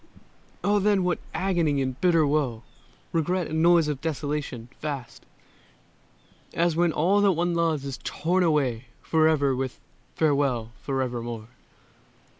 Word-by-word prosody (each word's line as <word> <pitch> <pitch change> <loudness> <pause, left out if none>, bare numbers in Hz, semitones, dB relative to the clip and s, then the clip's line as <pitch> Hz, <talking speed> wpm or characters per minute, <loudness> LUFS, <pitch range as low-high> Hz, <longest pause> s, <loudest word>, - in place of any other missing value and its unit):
Oh, 205 +1 +3
then 200 -1 +2
what 180 -1 0
agony 170 -7 +1
and 130 -1 -3
bitter 165 -4 +4
woe, 140 -6 0 0.5
Regret 175 +2 0
and 160 0 0
noise 170 -2 +5
of 145 -3 -3
desolation, 145 -5 -3
vast 140 -5 -6 1.3
As 170 -1 +2
when 170 0 +3
all 185 +7 +2
that 200 -2 +4
one 175 +1 0
loves 165 -4 0
is 135 -2 -5
torn 180 +3 0
away 135 -8 +1 0.2
Forever 155 -4 +3
with 130 0 -4 0.4
"farewell 140 -7 +1
forevermore"! 120 -4 -3
155 Hz, 125 wpm, -26 LUFS, 135-170 Hz, 1.3 s, noise